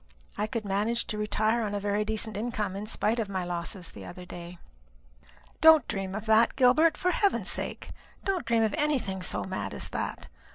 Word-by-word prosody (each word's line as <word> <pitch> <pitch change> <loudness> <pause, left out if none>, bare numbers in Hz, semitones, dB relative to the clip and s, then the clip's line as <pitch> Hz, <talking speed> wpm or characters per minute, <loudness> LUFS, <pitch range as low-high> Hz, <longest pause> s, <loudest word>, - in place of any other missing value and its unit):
I 210 - -1
could 225 -2 -4
manage 210 +4 0
to 210 - -4
retire 215 +2 +1
upon 205 -2 -2
a - - -1
very 205 +1 0
decent 220 0 -1
income, 210 -3 -2
in 205 +2 -5
spite 225 +1 0
of 215 -3 -2
my 190 -2 -2
losses 175 0 -3
the - - -10
other 180 0 -9
day." 175 0 -9 1.0
"Don't 320 -1 +7
dream 195 -1 -3
of 215 0 -5
that, 220 +1 +4
Gilbert; 280 +5 +4
for 360 - +1
heaven's 400 +2 +1
sake, - - -3 0.3
don't 385 -3 0
dream 230 -1 +3
of 215 -2 +1
anything 255 -11 0
so 180 - -1
mad 100 - -4
as - - -3
that. - - -4
215 Hz, 195 wpm, -28 LUFS, 195-235 Hz, 1.0 s, Don't